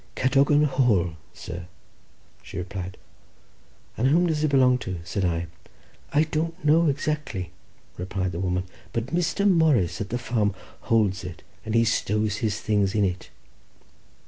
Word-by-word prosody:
"Cadogan 140 +3 +4
Hall, 120 - +2 0.2
sir," 90 0 -8 0.7
she - - -9
replied. 95 0 -5 1.0
"And 125 - +1
whom 165 +6 +4
does 155 -3 0
it - - +4
belong 130 -2 +4
to?" 95 -5 -4
said 95 +3 -2
I. 85 -1 0 0.7
"I 150 +2 +4
don't 165 +2 -3
know 160 +3 +5
exactly," 140 - -2 0.5
replied 95 0 -2
the 85 - -5
woman, 90 0 0 0.3
"but 115 +5 -3
Mr. 180 +4 +1
Morris 155 - +3
at 100 - -4
the 120 - -1
farm 105 -5 0 0.3
holds 105 -5 +2
it, 90 -4 -8 0.2
and 115 +1 +2
stows 105 -1 0
his 110 -3 -1
things 105 -2 +1
in 105 - +3
it." 90 -1 -3
110 Hz, 145 wpm, -25 LUFS, 95-145 Hz, 1.0 s, know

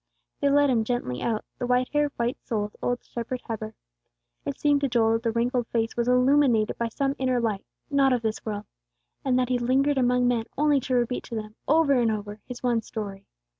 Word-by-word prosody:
They 285 - +2
led 285 0 +4
him 230 -3 +2
gently 220 - -2
out, 220 -2 -1
the 245 - -2
white 250 0 +2
haired, 295 -1 +2
white 240 +2 0
souled 210 -4 -3
old 245 0 -1
shepherd 245 +1 -5
Heber. 220 -1 -5 0.7
It 140 - -4
seemed 290 -1 +3
to 280 - +2
Joel 225 -2 +3
that 225 - 0
the 230 -1 0
wrinkled 240 +1 0
face 225 -1 -1
was 235 0 0
illuminated 250 -3 +3
by 235 - 0
some 275 +4 -1
inner 255 -1 +1
light, 220 -4 -1 0.3
not 275 -1 +4
of 245 -2 +1
this 220 -1 -2
world, 210 -1 -4 0.6
and 260 -2 +2
that 250 -1 +1
he 250 -1 +1
lingered 270 +3 +2
among 250 0 +3
men 235 -2 +1
only 295 -1 +3
to 255 0 -2
repeat 245 0 0
to 235 - -6
them, 215 -1 -5
over 305 -1 +4
and 240 -3 +3
over, 210 -1 -4
his 250 -1 -8
one 240 -2 +2
story. 205 -3 -7
245 Hz, 210 wpm, -26 LUFS, 225-260 Hz, 0.7 s, led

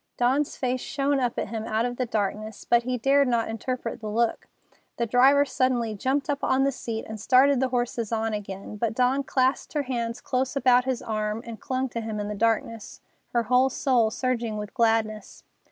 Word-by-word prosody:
Dawn's 265 +4 +1
face 255 -1 -1
shone 280 0 0
up 245 -2 -1
at - - -2
him 220 0 -4
out 220 +2 0
of 245 0 -3
the 255 - -1
darkness, 215 0 -3
but 240 0 +4
he 250 +1 -2
dared 275 +3 +3
not 235 -2 +1
interpret 230 +1 -4
the 215 - -4
look. 230 +2 0 0.5
The 235 - 0
driver 265 +5 +5
suddenly 250 -4 0
jumped 265 +8 -1
up 285 -2 -2
on 265 +1 +2
the 275 - +2
seat 230 -4 -5
and 220 0 -7
started 260 +3 +4
the 265 - +2
horses 240 -2 -2
on 225 -1 -1
again, 200 0 -6
but 225 0 -1
Dawn 255 +2 +2
clasped 265 -1 0
her 295 -2 0
hands 235 -3 -3
close 260 +1 -2
about 250 -2 +4
his 260 -2 -2
arm 215 0 -2
and 230 -3 -8
clung 260 0 -1
to 230 -1 -4
him 220 -1 -4
in 205 0 -3
the - - -3
darkness, 225 +1 -1 0.3
her 235 -1 +2
whole 250 +3 +3
soul 250 -4 +2
surging 235 -2 -2
with 210 0 -6
gladness. 225 -2 0
240 Hz, 200 wpm, -26 LUFS, 220-260 Hz, 0.5 s, driver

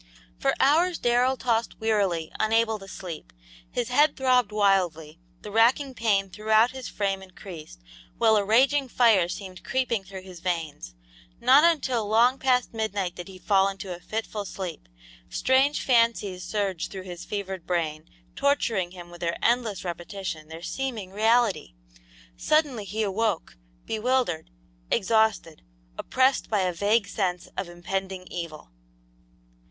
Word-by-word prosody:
For - - +1
hours 330 +6 +3
Darrell 245 +2 +2
tossed 230 -2 -1
wearily, 200 -7 0
unable 220 0 +2
to 195 - -11
sleep. 175 -4 -8 0.4
His 240 -1 -2
head 290 +4 +3
throbbed 250 -4 +3
wildly, 180 -6 +1 0.2
the 210 - -7
racking 245 +5 +3
pain 205 -5 +1
throughout 220 +3 +3
his 260 -1 -7
frame 195 -2 -2
increased, 180 - -11 0.4
while 220 -1 +4
a 205 - +3
raging 265 +7 +3
fire 225 -8 +4
seemed 185 0 -7
creeping 250 -6 -1
through 190 0 -9
his 185 -2 -11
veins. 160 - -4 0.4
Not 275 +4 +6
until 265 -10 +2
long 235 +5 +4
past 250 -2 +1
midnight 205 -5 -2
did 175 +1 -8
he 190 -1 -11
fall 195 +1 +3
into 190 -2 -6
a - - -12
fitful 215 +2 -4
sleep. 180 - -7 0.4
Strange 265 +3 +2
fancies 230 -7 +2
surged 195 -3 -2
through 190 -1 -7
his 175 -2 -8
fevered 195 -4 -5
brain, 160 -3 -2 0.3
torturing 230 -10 +1
him 175 -1 -11
with 175 - -12
their 170 0 -1
endless 230 -5 +1
repetition, 175 -2 -5
their 160 +1 -10
seeming 225 -4 -4
reality. 220 - +2 0.6
Suddenly 285 - +1
he 215 +3 -2
awoke, 205 - -1 0.3
bewildered, 225 -7 0 0.4
exhausted, 220 -6 +1 0.3
oppressed 260 - +1
by 210 -3 +1
a 180 -1 0
vague 205 +4 +2
sense 180 -3 -2
of 190 -2 -4
impending 190 +2 -4
evil. 165 - -7
205 Hz, 140 wpm, -26 LUFS, 180-235 Hz, 0.6 s, Not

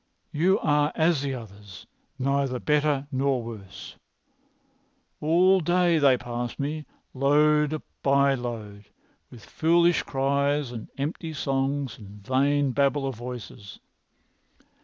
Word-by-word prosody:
"You 180 +6 +2
are 150 0 +2
as 160 -3 +2
the 140 -2 -2
others, 100 -5 -11 0.3
neither 135 -1 0
better 150 -1 +1
nor 135 -2 0
worse. 110 -5 -10 1.2
All 180 +5 +4
day 175 0 +2
they 135 -3 +5
pass 120 -1 -5
me, 150 +2 -4 0.3
load 150 +2 +2 0.2
by 140 0 +3
load, 110 -5 -6 0.4
with 115 -4 -14
foolish 170 +2 +2
cries 140 0 0
and 115 -3 -7
empty 160 +3 -4
songs 135 -2 -2
and 100 -1 -13
vain 140 +2 +2
babble 140 +1 +1
of 135 - -2
voices. 120 -4 -9
140 Hz, 115 wpm, -26 LUFS, 120-150 Hz, 1.2 s, they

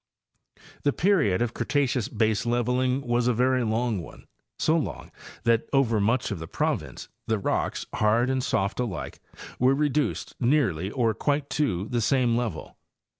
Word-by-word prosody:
The 145 - +1
period 155 - +2
of 120 -1 -3
Cretaceous 125 -2 0
baseleveling 120 +3 +1
was 120 0 +1
a 125 - +2
very 130 +1 +2
long 110 -2 0
one—so 155 - -4
long 160 - -3 0.3
that 115 -1 +2
over 125 -6 +2
much 115 +4 +1
of 100 - -3
the 80 - -7
province - - -2 0.2
the 110 - +1
rocks, 100 - -1
hard 110 +3 +2
and 130 -1 0
soft 100 0 -1
alike, 115 -7 -4 0.4
were 130 +2 +4
reduced 150 0 -1
nearly 120 - +1
or 115 -1 +1
quite 145 +5 -1
to 105 -10 0
the 120 -1 -1
same 125 0 +2
level. 120 -2 -4
120 Hz, 145 wpm, -26 LUFS, 110-130 Hz, 0.4 s, were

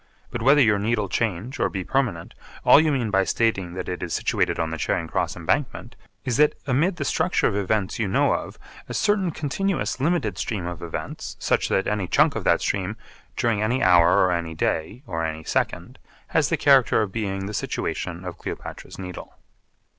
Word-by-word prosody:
But 120 - -4
whether 140 +4 +5
your 105 -5 +4
Needle 105 0 0
change 115 +3 -2
or - - +2
be 95 -2 -4
permanent, 110 -9 -1 0.3
all - - +8
you 155 -1 +3
mean 120 -6 -1
by 95 -1 +3
stating 95 -5 0
that 90 - -5
it 90 - -4
is 90 - -2
situated - - 0
on 80 -1 -1
the 80 - -4
Charing - - -1
Cross - - -1
Embankment, 120 - -2 0.3
is 125 -3 0
that 150 0 +4
amid 145 +8 +1
the - - -4
structure 180 +3 +1
of 100 - +2
events 100 0 -1
you 110 - 0
know 95 - +2
of - - -4 0.3
a - - -4
certain 205 -3 +2
continuous 165 +3 -2
limited 170 +6 0
stream 100 -7 -3
of 85 -1 -5
events, 85 -1 -6
such - - 0
that 95 - +1
any 105 -3 -1
chunk - - +3
of - - -3
that - - +3
stream, 100 +2 -2 0.4
during 115 -3 +1
any 120 +5 +1
hour, 90 -1 +6
or 90 - +2
any 85 -2 -2
day, 80 - -2
or 80 -2 -3
any 80 0 -3
second, - - -2 0.3
has - - +2
the - - +1
character 135 -5 +4
of 100 - -5
being 95 -3 -3
the 105 - -5
situation 90 -3 -3
of 90 - -7
Cleopatra's - - -7
Needle. 90 -2 -8
105 Hz, 195 wpm, -24 LUFS, 90-130 Hz, 0.4 s, all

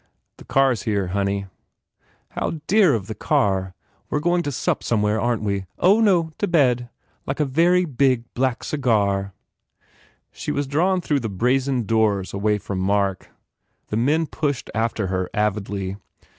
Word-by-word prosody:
"The - - -14
car 135 0 +3
s 120 - -2
here, 100 -4 -1
honey." 100 +1 -1 0.9
"How 160 - -3
dear 195 - +4
of 100 -5 -3
the 110 - -5
car! 95 -3 0 0.3
We - - -2
re 150 - +1
going 175 +1 +2
to 145 - -3
sup - - -1
somewhere, 105 -1 +1
aren 120 -2 0
t - - -4
we? 100 -2 -1
Oh, 195 +5 +4
no, 175 -7 +3
to 205 - 0
bed. 125 -8 +2 0.4
Like 135 - -3
a 150 - +3
very 170 +6 +3
big, 130 -4 +1
black 130 -1 -1
cigar 100 -8 0 0.5
" - - -33 0.3
She - - -5
was 145 - -1
drawn 180 +7 +1
through 145 -4 0
the 115 -4 -4
brazen 125 +5 +1
doors 105 -3 +1
away 105 +1 +1
from 100 -2 -5
Mark. 100 0 0 0.6
The 105 - -1
men 150 +8 +2
pushed 145 -4 -3
after 110 -2 -1
her 95 -1 -2
avidly. 100 -2 -2
115 Hz, 170 wpm, -22 LUFS, 100-145 Hz, 0.9 s, dear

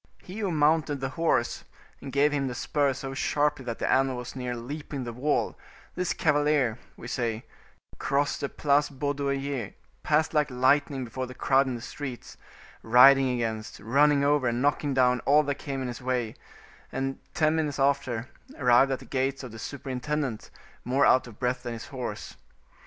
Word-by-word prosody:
He 190 +4 -8
who 205 -3 -1
mounted 150 -1 +2
the 135 0 -2
horse, 130 -4 0 0.4
and 135 - -7
gave 145 +3 +3
him 140 -2 0
the 125 - -4
spur 145 +1 +1
so 135 +1 -6
sharply 145 0 0
that 115 -2 -4
the - - -2
animal 135 -1 +2
was 125 +1 -7
near 125 -1 -3
leaping 140 +3 -6
the 120 -1 -5
wall, 140 +5 0 0.4
this 180 -1 -1
cavalier, 145 -6 +2 0.2
we 120 - -9
say, 115 -2 -2 0.5
crossed 140 0 0
the 140 - -2
Place 145 0 +2
Baudoyer, 140 -3 -2 0.3
passed 155 +1 +1
like 150 -1 +2
lightening 135 +2 +2
before 130 +3 -5
the 130 - -10
crowd 135 +2 +3
in 130 - -2
the 120 - -7
streets, 135 -4 -7 0.5
riding 130 +3 +7
against, 115 -3 -3
running 140 +6 +3
over 145 -2 +2
and 120 0 0
knocking 145 +1 +1
down 125 -1 +3
all 150 +4 +4
that 140 -1 -3
came 135 -2 -4
in - - -3
his 120 0 -6
way, 125 -3 -1 0.6
and, 135 0 -3 0.2
ten 155 0 +3
minutes 155 -3 -1
after, 135 -4 0 0.3
arrived 125 +1 +4
at 135 - 0
the - - -13
gates 135 0 -1
of 125 - -7
the 115 - -10
superintendent, 135 -1 -4 0.3
more 130 +3 +2
out 130 - +4
of 110 -3 -12
breath 125 0 -1
than 120 -1 -5
his 115 - -8
horse. 130 -3 -6
135 Hz, 180 wpm, -27 LUFS, 125-145 Hz, 0.6 s, riding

